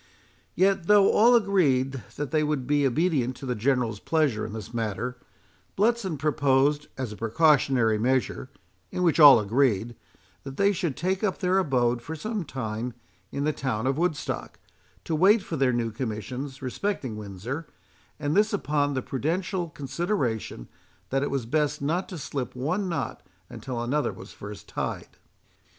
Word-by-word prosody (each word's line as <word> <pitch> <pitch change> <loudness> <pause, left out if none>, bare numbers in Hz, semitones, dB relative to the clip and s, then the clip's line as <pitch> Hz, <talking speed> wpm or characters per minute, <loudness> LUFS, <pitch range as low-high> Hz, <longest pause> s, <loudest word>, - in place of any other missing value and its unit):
Yet 190 -1 +2
though 205 -1 +6
all 235 +3 +6
agreed 140 - +2
that 145 -1 -4
they 155 -1 +2
would 150 -4 -1
be 145 +1 +2
obedient 135 -3 +1
to 135 - -9
the 125 - -1
General's 120 -2 0
pleasure 150 -8 +1
in 110 - -8
this 110 0 -7
matter, 115 +2 -2 0.6
Bletson 210 -5 +1
proposed, 145 0 +2
as 130 -5 -3
a - - -7
precautionary 120 -3 +3
measure, 130 +2 0 0.4
in 180 - -2
which 170 -2 +3
all 145 -6 +10
agreed, 115 0 +1 0.5
that 135 -1 -8
they 200 0 +4
should 170 -8 -2
take 185 +4 -1
up 200 -3 0
their 185 0 +2
abode 125 -8 +1
for 160 +7 -6
some 215 +5 -3
time 115 -3 -4 0.4
in 140 - -2
the 155 +1 +1
town 130 -5 -2
of 135 +3 0
Woodstock, 165 -4 -2 0.5
to - - -3
wait 195 +6 +5
for 165 - -5
their 135 -3 +2
new 120 -2 -1
commissions 125 +4 -5
respecting 130 - -3
Windsor; 105 - -6 0.5
and 145 +2 -1
this 210 +2 +3
upon 145 -6 0
the 130 - -2
prudential 175 +6 -2
consideration, 135 - -3 0.4
that 135 +1 +1
it 145 - -1
was 135 -4 -2
best 150 +3 0
not 165 +7 -1
to 185 - -6
slip 135 -4 -4
one 170 +10 -1
knot 170 - -3 0.3
until 125 -3 -5
another 135 +6 0
was - - -11
first 100 0 -9
tied. - - -5
140 Hz, 160 wpm, -26 LUFS, 125-170 Hz, 0.6 s, all